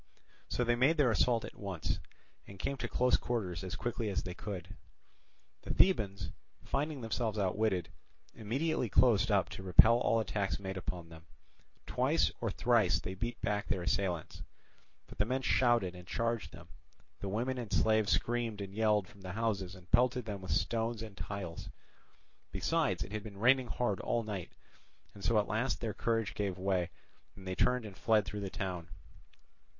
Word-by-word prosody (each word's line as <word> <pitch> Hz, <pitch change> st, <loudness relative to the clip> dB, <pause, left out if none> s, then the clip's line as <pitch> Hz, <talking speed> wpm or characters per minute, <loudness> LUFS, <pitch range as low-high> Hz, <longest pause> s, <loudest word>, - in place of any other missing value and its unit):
So 125 Hz, -, 0 dB
they 120 Hz, 0 st, +2 dB
made 135 Hz, +7 st, +3 dB
their 135 Hz, -5 st, +4 dB
assault 115 Hz, +1 st, +2 dB
at -, -, -9 dB
once, 95 Hz, -6 st, -3 dB, 0.5 s
and 100 Hz, -, -11 dB
came 140 Hz, +9 st, -2 dB
to 125 Hz, -, -3 dB
close 125 Hz, +1 st, +3 dB
quarters 95 Hz, -9 st, -2 dB
as 95 Hz, -, -4 dB
quickly 120 Hz, -2 st, -2 dB
as 95 Hz, -, -1 dB
they 90 Hz, -, -5 dB
could. 95 Hz, -2 st, -7 dB, 0.9 s
The -, -, -7 dB
Thebans, 105 Hz, -, +2 dB, 0.3 s
finding 145 Hz, 0 st, -2 dB
themselves 115 Hz, -1 st, -1 dB
outwitted, 95 Hz, -2 st, +1 dB, 0.4 s
immediately 125 Hz, +4 st, -1 dB
closed 110 Hz, -2 st, +4 dB
up 100 Hz, -3 st, +3 dB
to -, -, -7 dB
repel 110 Hz, +6 st, +7 dB
all 115 Hz, -, +2 dB
attacks 105 Hz, -2 st, -1 dB
made 95 Hz, -1 st, -5 dB
upon 90 Hz, -2 st, -5 dB
them. 80 Hz, 0 st, -13 dB, 0.6 s
Twice -, -, +2 dB
or -, -, 0 dB
thrice -, -, +3 dB
they 95 Hz, -, -5 dB
beat 115 Hz, +5 st, -4 dB
back 105 Hz, 0 st, -1 dB
their 95 Hz, -4 st, -1 dB
assailants. 90 Hz, -3 st, -1 dB, 0.6 s
But -, -, -14 dB
the 105 Hz, -, +4 dB
men 130 Hz, +3 st, -1 dB
shouted 120 Hz, -9 st, +3 dB
and 90 Hz, -1 st, -11 dB
charged 115 Hz, 0 st, -1 dB
them, 85 Hz, 0 st, -13 dB, 0.5 s
the 100 Hz, -, -4 dB
women 125 Hz, +6 st, -1 dB
and 115 Hz, -5 st, -6 dB
slaves 110 Hz, -2 st, +3 dB
screamed 120 Hz, -3 st, 0 dB
and 100 Hz, -1 st, -6 dB
yelled 105 Hz, -2 st, +2 dB
from 100 Hz, -, -17 dB
the 95 Hz, 0 st, -6 dB
houses 100 Hz, -4 st, -1 dB
and 90 Hz, -1 st, -16 dB
pelted 125 Hz, 0 st, +3 dB
them 100 Hz, -3 st, -5 dB
with 95 Hz, -, -8 dB
stones 115 Hz, +6 st, 0 dB
and 105 Hz, -3 st, -9 dB
tiles; 95 Hz, -5 st, -5 dB, 0.8 s
besides, -, -, +1 dB
it -, -, -10 dB
had 105 Hz, 0 st, -3 dB
been 100 Hz, -1 st, -10 dB
raining 130 Hz, +4 st, +4 dB
hard 110 Hz, -4 st, -1 dB
all 120 Hz, -1 st, 0 dB
night; 100 Hz, -5 st, -5 dB, 0.6 s
and 100 Hz, -, -12 dB
so 115 Hz, +1 st, +3 dB
at 105 Hz, -, +2 dB
last 115 Hz, +5 st, 0 dB
their 110 Hz, -3 st, -2 dB
courage 115 Hz, -2 st, 0 dB
gave 100 Hz, -3 st, -2 dB
way, 95 Hz, -2 st, 0 dB, 0.5 s
and 95 Hz, -2 st, -11 dB
they 95 Hz, -, -1 dB
turned 125 Hz, +4 st, +2 dB
and 100 Hz, -3 st, -8 dB
fled 110 Hz, -1 st, +3 dB
through 105 Hz, 0 st, -5 dB
the 100 Hz, -, -3 dB
town. 95 Hz, -5 st, -4 dB
105 Hz, 175 wpm, -33 LUFS, 95-120 Hz, 0.9 s, repel